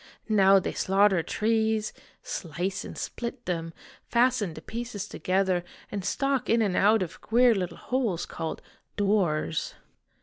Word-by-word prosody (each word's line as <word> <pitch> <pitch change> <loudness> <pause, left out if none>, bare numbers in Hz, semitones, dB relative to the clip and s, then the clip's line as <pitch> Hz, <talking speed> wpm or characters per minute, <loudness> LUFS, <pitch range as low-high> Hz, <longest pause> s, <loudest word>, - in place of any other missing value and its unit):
Now 195 -2 +6
they 190 - 0
slaughter 195 -1 +3
trees, 220 +2 0 0.3
slice 180 +3 -3
and - - -8
split 240 +1 -5
them, 165 -2 -2 0.4
fasten 235 -8 +2
the 155 - -8
pieces 230 -3 -5
together, 185 -1 0 0.3
and 200 -2 -3
stalk 275 +6 0
in 230 0 +4
and 195 -4 0
out 210 +1 +4
of 175 - -8
queer 240 +1 +4
little 185 -4 -3
holes 230 -10 -1
called 165 -1 -5 0.2
' - - -48
doors.' 185 -7 0
200 Hz, 140 wpm, -27 LUFS, 180-225 Hz, 0.4 s, Now